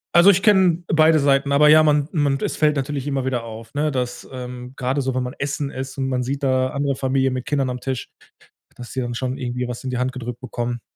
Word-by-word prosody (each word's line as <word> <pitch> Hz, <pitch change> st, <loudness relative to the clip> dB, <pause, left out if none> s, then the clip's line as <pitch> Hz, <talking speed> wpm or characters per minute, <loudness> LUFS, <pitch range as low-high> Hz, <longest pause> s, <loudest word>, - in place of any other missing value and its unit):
also 175 Hz, +3 st, +8 dB
ich 195 Hz, 0 st, +4 dB
kenne 185 Hz, -5 st, +4 dB
beide 160 Hz, 0 st, +5 dB
Seiten, 140 Hz, -1 st, +2 dB
aber 150 Hz, +2 st, +5 dB
ja, 155 Hz, +1 st, +8 dB
man 150 Hz, -2 st, +3 dB
man 145 Hz, -5 st, +1 dB
es -, -, -2 dB
fällt 150 Hz, -1 st, +2 dB
natürlich 140 Hz, 0 st, -3 dB
immer 135 Hz, -2 st, -1 dB
wieder 125 Hz, -3 st, -1 dB
auf, 115 Hz, 0 st, -10 dB
ne, 150 Hz, +2 st, 0 dB
dass, 125 Hz, -2 st, -4 dB
ähm, 125 Hz, 0 st, -7 dB
gerade 135 Hz, +2 st, -1 dB
so, 130 Hz, -1 st, -2 dB
wenn 130 Hz, -, 0 dB
man 125 Hz, -, -5 dB
essen 140 Hz, 0 st, -2 dB
ist 130 Hz, +1 st, -6 dB
und 135 Hz, -, -1 dB
man 130 Hz, -1 st, -1 dB
sieht 140 Hz, +3 st, -3 dB
da 130 Hz, -1 st, +2 dB
andere 140 Hz, 0 st, -1 dB
Familien 130 Hz, 0 st, 0 dB
mit 130 Hz, -1 st, -4 dB
Kindern 135 Hz, -3 st, 0 dB
am 125 Hz, -, -5 dB
Tisch, 130 Hz, -1 st, -4 dB, 0.7 s
dass 120 Hz, -1 st, -10 dB
die 130 Hz, -, -2 dB
dann 120 Hz, -1 st, -4 dB
schon 130 Hz, +2 st, -3 dB
irgendwie 125 Hz, 0 st, -3 dB
was 120 Hz, -1 st, -6 dB
in 130 Hz, -, -3 dB
die 125 Hz, -, -2 dB
Hand 130 Hz, 0 st, 0 dB
gedrückt 125 Hz, -2 st, -6 dB
bekommen. 120 Hz, -1 st, -4 dB
130 Hz, 245 wpm, -21 LUFS, 125-145 Hz, 0.7 s, also